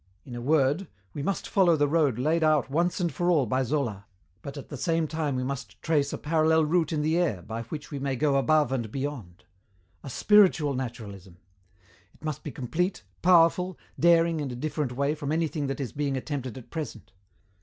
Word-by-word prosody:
In 125 Hz, -, -9 dB
a 120 Hz, -, -5 dB
word, 150 Hz, +6 st, +2 dB, 0.3 s
we 145 Hz, -, -5 dB
must 195 Hz, +7 st, -2 dB
follow 180 Hz, -4 st, +4 dB
the 145 Hz, -1 st, +2 dB
road 145 Hz, -6 st, +2 dB
laid 155 Hz, +6 st, +1 dB
out 155 Hz, -4 st, +2 dB
once 170 Hz, +6 st, +1 dB
and 175 Hz, -2 st, -1 dB
for 175 Hz, 0 st, 0 dB
all 155 Hz, -7 st, +3 dB
by 130 Hz, +4 st, 0 dB
Zola, 120 Hz, -7 st, -2 dB, 0.3 s
but 140 Hz, +6 st, -8 dB
at 140 Hz, -, -9 dB
the 145 Hz, -, -6 dB
same 165 Hz, +3 st, 0 dB
time 155 Hz, -3 st, -2 dB
we 125 Hz, -, -1 dB
must 130 Hz, -4 st, -5 dB
trace 145 Hz, -3 st, +1 dB
a -, -, -3 dB
parallel 160 Hz, 0 st, +2 dB
route 165 Hz, 0 st, +1 dB
in 150 Hz, -2 st, 0 dB
the 160 Hz, +3 st, +2 dB
air 115 Hz, -, 0 dB
by 115 Hz, +4 st, -5 dB
which 150 Hz, +6 st, -7 dB
we 140 Hz, -, -4 dB
may 135 Hz, -1 st, -1 dB
go 140 Hz, +1 st, +2 dB
above 150 Hz, 0 st, +3 dB
and 120 Hz, -5 st, -2 dB
beyond.... 130 Hz, -11 st, -5 dB, 0.6 s
A 140 Hz, -, -7 dB
spiritual 180 Hz, -, +4 dB
naturalism! 105 Hz, -8 st, -7 dB, 0.8 s
It -, -, -23 dB
must 155 Hz, -3 st, -3 dB
be -, -, -5 dB
complete, 160 Hz, -, -2 dB, 0.2 s
powerful, 180 Hz, 0 st, +4 dB, 0.2 s
daring 170 Hz, -1 st, +4 dB
in 145 Hz, -2 st, -3 dB
a 125 Hz, -, -5 dB
different 145 Hz, 0 st, -3 dB
way 140 Hz, +3 st, 0 dB
from 150 Hz, -2 st, -4 dB
anything 160 Hz, -2 st, -1 dB
that 135 Hz, -, -3 dB
is 135 Hz, -4 st, -3 dB
being 140 Hz, -2 st, -2 dB
attempted 130 Hz, -3 st, -4 dB
at 125 Hz, -, -12 dB
present. 150 Hz, -9 st, -6 dB
145 Hz, 200 wpm, -27 LUFS, 130-160 Hz, 0.8 s, follow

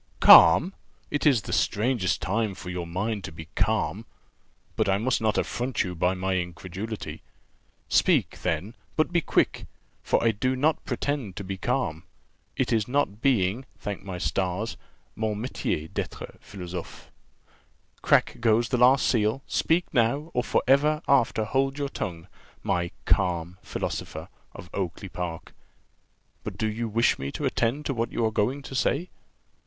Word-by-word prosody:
"Calm! 95 Hz, -, +8 dB, 0.4 s
It 145 Hz, +1 st, +1 dB
is 125 Hz, -8 st, +4 dB
the -, -, -5 dB
strangest 110 Hz, -3 st, +1 dB
time 105 Hz, 0 st, 0 dB
for 90 Hz, -1 st, -7 dB
your 90 Hz, -1 st, -4 dB
mind 100 Hz, +4 st, -2 dB
to 95 Hz, -, -7 dB
be 80 Hz, 0 st, -10 dB
calm. 110 Hz, +2 st, 0 dB, 0.7 s
But -, -, +1 dB
I 95 Hz, -, +3 dB
must 120 Hz, +4 st, 0 dB
not 110 Hz, -1 st, +1 dB
affront 125 Hz, 0 st, -1 dB
you 90 Hz, -, -4 dB
by 90 Hz, +2 st, +1 dB
my 95 Hz, +1 st, -1 dB
incredulity. 95 Hz, +5 st, -5 dB, 0.7 s
Speak, -, -, +2 dB
then, 85 Hz, +8 st, -2 dB, 0.2 s
but 155 Hz, -, +1 dB
be 170 Hz, -, +3 dB
quick, -, -, 0 dB, 0.3 s
for -, -, +1 dB
I 115 Hz, -, +4 dB
do 130 Hz, +5 st, -1 dB
not 150 Hz, +5 st, +1 dB
pretend 135 Hz, -10 st, -2 dB
to 100 Hz, -, -5 dB
be 95 Hz, 0 st, -4 dB
calm; 80 Hz, -3 st, -1 dB, 0.6 s
it 110 Hz, -2 st, +1 dB
not 125 Hz, -6 st, 0 dB
being, 120 Hz, -1 st, +1 dB
thank 100 Hz, -1 st, -5 dB
my 95 Hz, -3 st, -5 dB
stars, 90 Hz, +6 st, -1 dB, 0.4 s
'mon 110 Hz, -1 st, -1 dB
métier 105 Hz, -8 st, -3 dB
d'être -, -, -5 dB
philosophe.' 90 Hz, -3 st, -8 dB, 0.9 s
Crack -, -, +3 dB
goes 115 Hz, 0 st, +2 dB
the 125 Hz, -, +1 dB
last 125 Hz, +2 st, +5 dB
seal 115 Hz, +3 st, +1 dB
speak 170 Hz, +2 st, +1 dB
now, 140 Hz, +7 st, +1 dB
or 125 Hz, -, +1 dB
for -, -, +1 dB
ever 150 Hz, +3 st, +3 dB
after 120 Hz, -5 st, +3 dB
hold 135 Hz, +4 st, 0 dB
your 140 Hz, -1 st, -2 dB
tongue, 85 Hz, -9 st, -5 dB, 0.4 s
my 85 Hz, 0 st, 0 dB, 0.2 s
_calm 90 Hz, -2 st, +1 dB
philosopher -, -, -5 dB, 0.3 s
_of 90 Hz, -, -9 dB
Oakly 95 Hz, +1 st, -4 dB
park: 85 Hz, -2 st, -6 dB, 0.9 s
but -, -, -6 dB
do 110 Hz, -, -1 dB
you 115 Hz, +2 st, -2 dB
wish 115 Hz, +3 st, +2 dB
me 70 Hz, +1 st, -4 dB
to -, -, -3 dB
attend 135 Hz, +6 st, 0 dB
to 140 Hz, -, -1 dB
what 115 Hz, -1 st, -2 dB
you 115 Hz, -, 0 dB
are 110 Hz, -, +1 dB
going 130 Hz, +7 st, 0 dB
to 135 Hz, -, -9 dB
say?" 150 Hz, +6 st, 0 dB
110 Hz, 160 wpm, -26 LUFS, 95-130 Hz, 0.9 s, Calm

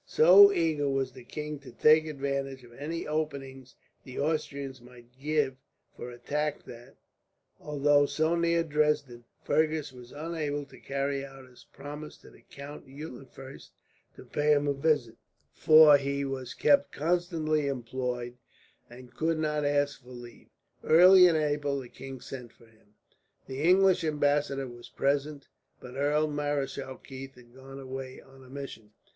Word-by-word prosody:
So 195 Hz, +5 st, +8 dB
eager 160 Hz, -6 st, 0 dB
was 135 Hz, -1 st, -1 dB
the 130 Hz, -1 st, -13 dB
king 150 Hz, +3 st, -6 dB
to 140 Hz, -, -13 dB
take 155 Hz, +1 st, +4 dB
advantage 140 Hz, -2 st, -4 dB
of 120 Hz, -1 st, -16 dB
any 155 Hz, +6 st, -5 dB
openings 135 Hz, -4 st, -5 dB, 0.3 s
the 130 Hz, -, -10 dB
Austrians 140 Hz, -3 st, -3 dB
might 120 Hz, 0 st, -17 dB
give 145 Hz, -2 st, 0 dB, 0.4 s
for 125 Hz, -, -8 dB
attack 145 Hz, +5 st, -3 dB
that, 120 Hz, +2 st, -13 dB, 0.6 s
although 145 Hz, -1 st, +2 dB
so 160 Hz, +3 st, 0 dB
near 170 Hz, 0 st, +1 dB
Dresden, 150 Hz, -6 st, -1 dB, 0.2 s
Fergus 155 Hz, -3 st, 0 dB
was 125 Hz, -1 st, -13 dB
unable 150 Hz, -2 st, -4 dB
to -, -, -16 dB
carry 140 Hz, 0 st, -2 dB
out 135 Hz, -1 st, -12 dB
his 125 Hz, -1 st, -19 dB
promise 145 Hz, +2 st, -9 dB
to -, -, -17 dB
the -, -, -19 dB
Count 140 Hz, +1 st, -11 dB
Eulenfurst 135 Hz, -1 st, -11 dB, 0.4 s
to -, -, -13 dB
pay 150 Hz, 0 st, +1 dB
him 145 Hz, 0 st, +1 dB
a 140 Hz, -, +2 dB
visit; 140 Hz, -5 st, 0 dB, 0.4 s
for 155 Hz, -1 st, +7 dB
he 140 Hz, 0 st, -2 dB
was 130 Hz, -2 st, -5 dB
kept 285 Hz, 0 st, +3 dB
constantly 160 Hz, -2 st, 0 dB
employed, 125 Hz, -1 st, -4 dB, 0.5 s
and 125 Hz, +1 st, -14 dB
could 160 Hz, +5 st, -1 dB
not 150 Hz, -1 st, -1 dB
ask 145 Hz, 0 st, 0 dB
for 125 Hz, -, -18 dB
leave. 120 Hz, -1 st, -12 dB, 0.4 s
Early 180 Hz, +3 st, +8 dB
in 170 Hz, -, +2 dB
April 145 Hz, -2 st, 0 dB
the 125 Hz, -2 st, -10 dB
king 135 Hz, 0 st, -10 dB
sent 125 Hz, -3 st, -9 dB
for 115 Hz, -, -22 dB
him. 110 Hz, -2 st, -27 dB, 0.5 s
The 135 Hz, +1 st, -6 dB
English 185 Hz, +2 st, +4 dB
ambassador 145 Hz, -3 st, 0 dB
was 120 Hz, -1 st, -12 dB
present, 140 Hz, +1 st, -1 dB, 0.3 s
but 125 Hz, -1 st, -11 dB
Earl 145 Hz, +2 st, +1 dB
Marischal 145 Hz, -3 st, -3 dB
Keith 135 Hz, 0 st, -10 dB
had 120 Hz, -1 st, -18 dB
gone 135 Hz, +1 st, -11 dB
away 130 Hz, -1 st, -7 dB
on 135 Hz, 0 st, -17 dB
a 130 Hz, -, -16 dB
mission. 130 Hz, -6 st, -9 dB
140 Hz, 150 wpm, -28 LUFS, 130-150 Hz, 0.6 s, So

